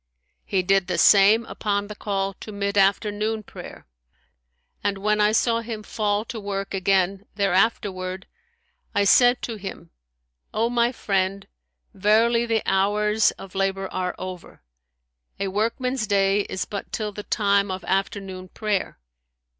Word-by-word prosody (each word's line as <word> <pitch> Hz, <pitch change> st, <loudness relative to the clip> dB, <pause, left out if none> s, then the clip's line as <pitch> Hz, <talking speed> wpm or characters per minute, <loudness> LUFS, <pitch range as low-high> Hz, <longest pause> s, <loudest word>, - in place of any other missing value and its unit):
He 190 Hz, -2 st, 0 dB
did 195 Hz, 0 st, +2 dB
the 180 Hz, -, -1 dB
same 210 Hz, +3 st, +6 dB
upon 205 Hz, -2 st, -2 dB
the 210 Hz, -, -7 dB
call 195 Hz, -2 st, -2 dB
to 215 Hz, -, -8 dB
mid 200 Hz, 0 st, -2 dB
afternoon 210 Hz, +2 st, +1 dB
prayer, -, -, -11 dB, 1.0 s
and 200 Hz, -1 st, 0 dB
when 210 Hz, +2 st, +1 dB
I 210 Hz, 0 st, +4 dB
saw 230 Hz, +1 st, +2 dB
him 225 Hz, -2 st, -6 dB
fall 210 Hz, -1 st, -1 dB
to 230 Hz, -1 st, -6 dB
work 195 Hz, -1 st, -4 dB
again 195 Hz, +1 st, +1 dB
thereafterward, 190 Hz, -2 st, 0 dB, 0.7 s
I 205 Hz, -, +3 dB
said 245 Hz, +5 st, +5 dB
to 230 Hz, -2 st, -4 dB
him, 195 Hz, -, -8 dB, 0.6 s
O 230 Hz, +2 st, +1 dB
my 240 Hz, 0 st, +2 dB
friend, 195 Hz, -4 st, -1 dB, 0.5 s
verily 230 Hz, +4 st, +3 dB
the 225 Hz, -1 st, +1 dB
hours 210 Hz, +2 st, +2 dB
of 195 Hz, -, -11 dB
labour 195 Hz, 0 st, -1 dB
are 180 Hz, -1 st, -2 dB
over; 185 Hz, -, -8 dB, 0.8 s
a 195 Hz, -, -1 dB
workman's 230 Hz, +4 st, -1 dB
day 200 Hz, 0 st, +2 dB
is 190 Hz, -, -2 dB
but 200 Hz, -2 st, -6 dB
till 215 Hz, -2 st, -3 dB
the 210 Hz, -, -7 dB
time 200 Hz, -1 st, +1 dB
of 185 Hz, 0 st, -4 dB
afternoon 190 Hz, -1 st, -2 dB
prayer.' 210 Hz, 0 st, -2 dB
200 Hz, 140 wpm, -24 LUFS, 195-215 Hz, 1.0 s, same